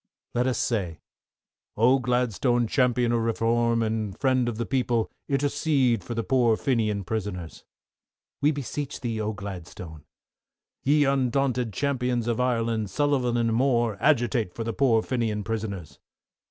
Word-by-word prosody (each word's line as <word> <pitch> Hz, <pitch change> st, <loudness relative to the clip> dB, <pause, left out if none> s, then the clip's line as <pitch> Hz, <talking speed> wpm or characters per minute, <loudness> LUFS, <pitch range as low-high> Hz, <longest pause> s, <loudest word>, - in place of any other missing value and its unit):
LET 125 Hz, +2 st, +1 dB
US 130 Hz, -, 0 dB
SAY, 95 Hz, -9 st, -1 dB, 0.8 s
Oh, 125 Hz, +5 st, +4 dB
Gladstone, 120 Hz, 0 st, +1 dB
Champion 125 Hz, 0 st, +2 dB
of 120 Hz, -, +2 dB
Reform, 115 Hz, +1 st, +1 dB
and 110 Hz, -3 st, -2 dB
Friend 130 Hz, -3 st, +2 dB
of 115 Hz, -, -5 dB
the 115 Hz, -, -2 dB
People, 120 Hz, -4 st, 0 dB, 0.2 s
intercede 140 Hz, -3 st, +1 dB
for 120 Hz, -, -5 dB
the 115 Hz, -, -1 dB
poor 120 Hz, -3 st, +3 dB
Fenian 110 Hz, -6 st, 0 dB
prisoners. 90 Hz, -4 st, -5 dB, 0.8 s
We 145 Hz, -, +4 dB
beseech 145 Hz, 0 st, -5 dB
thee, 115 Hz, -3 st, -2 dB
oh, 110 Hz, 0 st, -2 dB
Gladstone. 90 Hz, -6 st, -8 dB, 0.8 s
Ye 145 Hz, +2 st, +3 dB
undaunted 130 Hz, -3 st, +1 dB
Champions 125 Hz, -2 st, -1 dB
of 120 Hz, 0 st, 0 dB
Ireland, 115 Hz, -4 st, 0 dB
Sullivan 130 Hz, 0 st, +1 dB
and 115 Hz, -1 st, +1 dB
Moore, 120 Hz, -3 st, +2 dB
agitate 120 Hz, -8 st, +1 dB
for 115 Hz, -, -3 dB
the 115 Hz, 0 st, -3 dB
poor 115 Hz, -3 st, +3 dB
Fenian 115 Hz, -5 st, -1 dB
prisoners. 100 Hz, -, -5 dB
120 Hz, 140 wpm, -26 LUFS, 110-130 Hz, 0.8 s, Oh